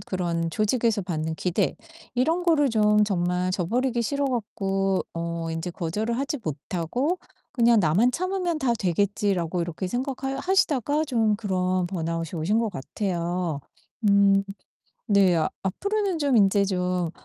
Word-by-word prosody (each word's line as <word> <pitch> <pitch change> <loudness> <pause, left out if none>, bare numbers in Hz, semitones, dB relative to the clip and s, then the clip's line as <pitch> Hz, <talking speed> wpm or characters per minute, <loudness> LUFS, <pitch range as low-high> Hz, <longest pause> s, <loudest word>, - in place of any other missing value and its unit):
그런 170 -3 -1
조직에서 215 +2 +1
받는 160 -3 -3
기대 180 +1 0 0.4
이런 320 +8 +1
거를 295 -6 +3
좀 210 -1 +4
정말 180 -2 0
저버리기 235 +8 0
싫어 280 +5 -1
갖고 195 -6 -1
어 170 0 -3
인제 165 +2 -3
거절을 205 +7 -2
하지 280 +3 -2
못하고 180 - -2 0.3
'그냥 235 -4 +4
나만 190 +9 +3
참으면 365 -1 -1
다 265 -5 +1
되겠지.'라고 185 -2 0
이렇게 170 +2 -3
생각하여 270 +4 -3
하시다가 300 - +1
좀 225 -6 +1
그런 185 -3 0
번아웃이 165 -2 -3
오신 205 +8 +1
것 230 - 0
같아요. 175 -1 -3 0.5
음. 200 0 +5 0.6
네. 195 -4 +4 0.3
앞으로는 400 - -1
좀 280 -4 +2
인제 200 -1 +4
좀 180 -3 -1
200 Hz, 290 characters per minute, -25 LUFS, 175-250 Hz, 0.6 s, 음